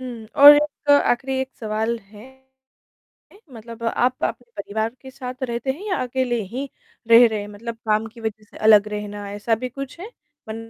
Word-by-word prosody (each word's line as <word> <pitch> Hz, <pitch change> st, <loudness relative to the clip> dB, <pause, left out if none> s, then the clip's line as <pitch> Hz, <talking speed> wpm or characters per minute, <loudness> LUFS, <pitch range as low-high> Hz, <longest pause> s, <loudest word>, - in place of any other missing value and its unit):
हुँ, 240 Hz, -4 st, -8 dB
और 290 Hz, +1 st, +11 dB
एक 290 Hz, 0 st, -1 dB
आखिरी 265 Hz, -2 st, +3 dB
एक 265 Hz, 0 st, -5 dB
सवाल 220 Hz, +1 st, -2 dB
है, 210 Hz, +2 st, -16 dB, 1.3 s
मतलब 230 Hz, 0 st, -11 dB
आप 245 Hz, +2 st, 0 dB
अपने 245 Hz, -1 st, -4 dB
परिवार 220 Hz, +2 st, -3 dB
के 265 Hz, -, -11 dB
साथ 255 Hz, 0 st, -8 dB
रहते 240 Hz, +1 st, -2 dB
हैं 320 Hz, -, -12 dB
या 370 Hz, -, 0 dB
अकेले 250 Hz, -2 st, -1 dB
ही 270 Hz, +4 st, -4 dB, 0.4 s
रह 235 Hz, +1 st, +9 dB
रहे 215 Hz, -2 st, -3 dB
हैं? 205 Hz, -, -7 dB
मतलब 225 Hz, +3 st, -7 dB
काम 215 Hz, +1 st, +2 dB
की 230 Hz, +1 st, -13 dB
वज़ह 220 Hz, -1 st, -5 dB
से -, -, -16 dB
अलग 210 Hz, -1 st, +7 dB
रहना 205 Hz, -1 st, -6 dB
ऐसा 210 Hz, +3 st, 0 dB
भी 255 Hz, -, -2 dB
कुछ 275 Hz, +5 st, -8 dB
है? 420 Hz, +6 st, -8 dB, 0.4 s
बन 220 Hz, -, -5 dB
235 Hz, 185 wpm, -22 LUFS, 215-260 Hz, 1.3 s, और